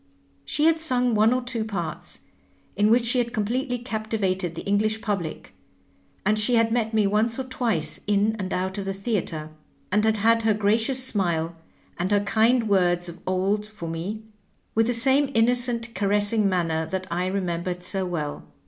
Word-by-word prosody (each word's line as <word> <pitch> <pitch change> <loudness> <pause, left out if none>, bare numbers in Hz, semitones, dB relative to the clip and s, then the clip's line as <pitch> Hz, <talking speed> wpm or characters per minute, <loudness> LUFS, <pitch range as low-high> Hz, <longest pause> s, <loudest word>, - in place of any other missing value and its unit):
She 300 - 0
had 325 0 +4
sung 250 -6 +1
one 215 +1 +4
or 255 0 0
two 245 -3 -2
parts, 180 -7 -5 0.5
in 210 +1 +3
which 235 +1 +4
she 245 +2 +3
had 235 -1 -1
completely 245 +4 -1
captivated 215 -7 -2
the - - -6
English 215 +2 +1
public, 195 -7 -4 0.7
and 215 +2 +2
she 235 +3 +4
had 230 -1 +3
met 225 -2 0
me 215 -2 +2
once 215 +3 +1
or 265 - -2
twice 250 -3 -1
in 210 +1 +2
and 190 -1 -4
out 190 +2 -2
of 195 - -4
the 195 0 -3
theatre, 185 -7 -3 0.4
and 210 +2 +2
had 220 0 +2
had 230 +2 +3
her 220 -1 +2
gracious 225 +5 +1
smile 170 -8 -1 0.4
and 180 +2 0
her 205 -1 +3
kind 225 +3 +2
words 175 -3 +2
of 170 +1 -10
old 195 +3 0
for 210 -6 -8
me, 180 +7 -5 0.5
with 225 0 +2
the 245 - +1
same 270 +4 +5
innocent 240 0 +1
caressing 205 +1 +1
manner 165 -3 -1
that 185 +2 -3
I 180 +2 -1
re 195 +2 -1
membered 180 0 -3
so 195 +1 -2
well. 160 -5 -4
210 Hz, 180 wpm, -24 LUFS, 185-230 Hz, 0.7 s, same